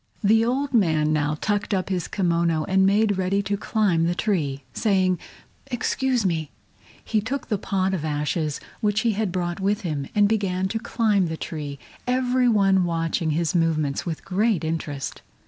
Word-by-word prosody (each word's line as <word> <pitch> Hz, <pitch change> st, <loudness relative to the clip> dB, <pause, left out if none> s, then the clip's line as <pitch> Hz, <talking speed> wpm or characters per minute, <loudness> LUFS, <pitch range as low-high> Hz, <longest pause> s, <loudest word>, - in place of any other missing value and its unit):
The 220 Hz, +2 st, +5 dB
old 270 Hz, +4 st, -1 dB
man 160 Hz, -8 st, +3 dB
now 150 Hz, 0 st, 0 dB
tucked 205 Hz, 0 st, 0 dB
up 185 Hz, 0 st, -2 dB
his 180 Hz, -4 st, -1 dB
kimono 170 Hz, -4 st, +1 dB
and 190 Hz, +2 st, +3 dB
made 205 Hz, 0 st, +2 dB
ready 195 Hz, +2 st, +1 dB
to 200 Hz, +1 st, -1 dB
climb 195 Hz, -5 st, +1 dB
the 175 Hz, +1 st, 0 dB
tree. 150 Hz, -10 st, -1 dB
Saying 190 Hz, -4 st, +2 dB, 0.5 s
"Excuse 250 Hz, -1 st, 0 dB
me," 160 Hz, -5 st, 0 dB, 0.6 s
he 215 Hz, -2 st, +1 dB
took 255 Hz, +6 st, -4 dB
the 210 Hz, -, 0 dB
pot 190 Hz, 0 st, 0 dB
of 175 Hz, -5 st, -2 dB
ashes 150 Hz, 0 st, -1 dB, 0.2 s
which 210 Hz, -1 st, +1 dB
he 230 Hz, -, +2 dB
had 210 Hz, -2 st, -1 dB
brought 175 Hz, -1 st, -2 dB
with 205 Hz, +3 st, 0 dB
him, 150 Hz, -7 st, -3 dB
and 205 Hz, -1 st, +5 dB
began 190 Hz, -3 st, 0 dB
to 225 Hz, -, -2 dB
climb 220 Hz, -5 st, +1 dB
the 160 Hz, 0 st, -4 dB
tree, 145 Hz, -4 st, -5 dB, 0.3 s
every 250 Hz, 0 st, +2 dB
one 195 Hz, -4 st, +4 dB
watching 165 Hz, -1 st, -1 dB
his 160 Hz, +1 st, 0 dB
movements 155 Hz, -5 st, +1 dB
with 165 Hz, -3 st, -5 dB
great 200 Hz, -1 st, +1 dB
interest. 155 Hz, -3 st, -4 dB
190 Hz, 170 wpm, -24 LUFS, 165-210 Hz, 0.6 s, The